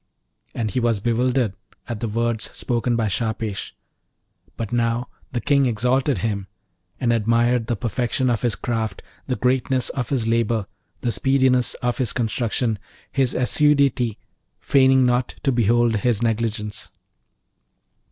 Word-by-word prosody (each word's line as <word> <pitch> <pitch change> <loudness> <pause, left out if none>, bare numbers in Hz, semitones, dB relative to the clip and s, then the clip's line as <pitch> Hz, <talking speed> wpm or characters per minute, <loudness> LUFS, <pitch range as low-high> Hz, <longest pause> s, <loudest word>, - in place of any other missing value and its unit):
And 110 -3 -1
he 125 - 0
was 115 -3 +1
bewildered 120 0 +1 0.3
at 120 -3 -4
the 115 - -2
words 115 0 -1
spoken 120 0 -1
by 115 -2 +1
Shahpesh; 110 -1 -3 0.8
but 115 0 -4
now 120 +1 0 0.2
the 120 - -1
King 140 +1 +3
exalted 125 +3 +1
him, 100 0 -2 0.5
and 120 -2 +2
admired 115 +1 +2
the 120 - 0
perfection 120 +4 -1
of 120 -3 +1
his 120 -3 +1
craft, 110 -5 -3 0.2
the 130 - 0
greatness 130 0 +1
of 125 -4 -3
his 130 -5 0
labour, 115 -2 +1 0.4
the 120 - 0
speediness 130 +2 +2
of 120 +1 0
his 125 - 0
construction, 115 -1 -1 0.3
his 130 -3 +1
assiduity; 135 -4 +2 0.4
feigning 130 -1 +4
not 125 0 +1
to 135 - +2
behold 120 -1 +3
his 115 +1 +1
negligence. 110 -2 -2
120 Hz, 135 wpm, -22 LUFS, 115-125 Hz, 0.8 s, feigning